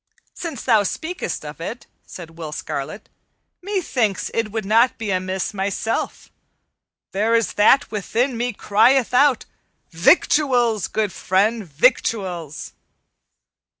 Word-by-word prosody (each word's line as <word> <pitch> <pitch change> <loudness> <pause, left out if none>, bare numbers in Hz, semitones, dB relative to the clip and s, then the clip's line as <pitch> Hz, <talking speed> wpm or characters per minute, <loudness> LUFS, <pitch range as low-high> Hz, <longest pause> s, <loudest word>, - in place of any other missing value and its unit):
"Since 325 -9 -6
thou 225 -4 +4
speakest 320 - -4
of - - -9
it," - - -6 0.2
said 170 -3 -10
Will 165 -2 -8
Scarlet, 150 +5 -5 0.5
"methinks 285 - -1
it 225 -2 -1
would 220 -1 -3
not 230 +5 +3
be 220 -3 -3
amiss 185 +1 -2
myself. 200 +3 -3 0.8
There 215 +4 +1
is 230 -1 +1
that 220 +7 +4
within 230 +5 -1
me 240 +2 -1
crieth 230 +5 +2
out, 265 -1 +4 0.5
'Victuals, 240 - +3
good 210 -3 -2
friend, 210 +4 +1
victuals!'" 175 - 0
220 Hz, 115 wpm, -21 LUFS, 190-250 Hz, 0.8 s, thou